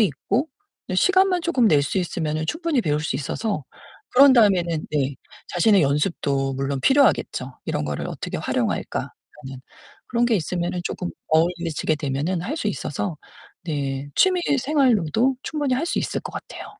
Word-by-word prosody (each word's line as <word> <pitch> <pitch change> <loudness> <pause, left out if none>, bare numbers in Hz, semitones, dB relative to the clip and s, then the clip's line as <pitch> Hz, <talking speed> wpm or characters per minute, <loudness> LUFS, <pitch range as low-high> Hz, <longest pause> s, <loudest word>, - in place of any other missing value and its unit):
있고 225 - 0 0.4
네 185 - -2
시간만 375 - +3
쪼금 255 -10 +3
낼 145 -2 +4
수 165 +7 -1
있으면은 160 -3 -2
충분히 320 -5 0
배울 150 -1 0
수 160 - -2
있어서 155 - -3 0.5
그런 270 +1 +7
다음에는 180 -9 +3
네 140 -2 0 0.3
자신의 185 +1 +4
연습도 140 -2 0
물론 135 0 -2
필요하겠죠. 260 - +2
'이런 75 - -1
거를 75 -1 -3
어떻게 - - -5
활용할까?' - - -1
라는 135 -3 -11 0.5
그런 240 0 +1
게 230 -3 +3
있으면은 175 +1 -2
쪼금 180 - -3 0.2
어울리지게 165 -1 +1
되면은 150 +5 -2
할 295 - -3
수 215 - -1
있어서 165 -2 -3 0.5
네 140 -3 -3
취미 370 -1 +4 0.2
생활로도 255 - +2
충분히 290 -5 -1
할 285 +6 -1
수 - - -1
있을 - - -2
것 - - -8
같아요. - - -8
175 Hz, 345 characters per minute, -23 LUFS, -, 0.5 s, 그런